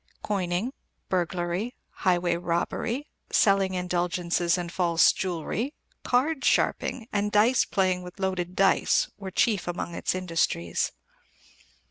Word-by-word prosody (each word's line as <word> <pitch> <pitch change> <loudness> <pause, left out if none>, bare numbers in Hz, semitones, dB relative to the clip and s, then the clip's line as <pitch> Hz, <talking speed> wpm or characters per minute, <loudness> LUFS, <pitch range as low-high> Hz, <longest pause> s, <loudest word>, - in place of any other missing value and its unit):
Coining, 195 +4 -1 0.4
burglary, 180 +5 -1 0.2
highway 180 -2 +1
robbery, 175 +10 -2 0.3
selling 195 -3 +3
indulgences 175 -1 0
and 175 -1 -4
false 170 -2 +4
jewellery, 190 - -3 0.3
card 270 +3 +1
sharping, 235 -2 +1
and 205 0 0
dice 225 +5 +4
playing 185 -2 +1
with 180 +2 -11
loaded 185 -2 -2
dice, 195 0 +3
were 195 -1 -5
chief 200 0 +1
among 175 -1 -3
its - - -1
industries." 165 - 0
185 Hz, 110 wpm, -27 LUFS, 175-205 Hz, 0.4 s, false